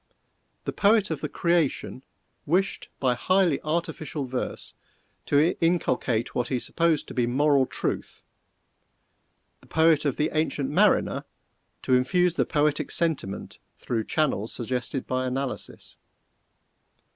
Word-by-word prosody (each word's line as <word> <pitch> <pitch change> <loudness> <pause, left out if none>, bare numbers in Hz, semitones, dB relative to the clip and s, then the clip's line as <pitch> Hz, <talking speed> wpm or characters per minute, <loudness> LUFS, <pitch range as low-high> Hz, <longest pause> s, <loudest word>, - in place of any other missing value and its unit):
The - - -3
poet 210 0 +3
of - - -3
the - - -3
"Creation" 170 -7 0 0.5
wished, 190 +6 0
by 130 -2 +2
highly 180 +3 +2
artificial 155 -2 -3
verse, 130 0 -5 0.5
to 150 +4 +3
inculcate 130 -8 +1
what 120 -1 -1
he 130 - 0
supposed 165 +4 0
to - - -7
be 120 -2 +1
moral 140 +1 +3
truth - - -4 1.4
the - - -21
poet 160 -2 +3
of 140 - +1
the 150 - 0
"Ancient 150 -3 -1
Mariner" - - +3 0.6
to 130 - +1
infuse 175 +8 +3
the - - +1
Poetic 150 -1 +1
Sentiment 160 - -2 0.2
through 115 -3 -2
channels 135 -8 0
suggested 125 +2 -3
by 130 0 -1
analysis. 130 +1 -5
145 Hz, 120 wpm, -26 LUFS, 130-165 Hz, 1.4 s, poet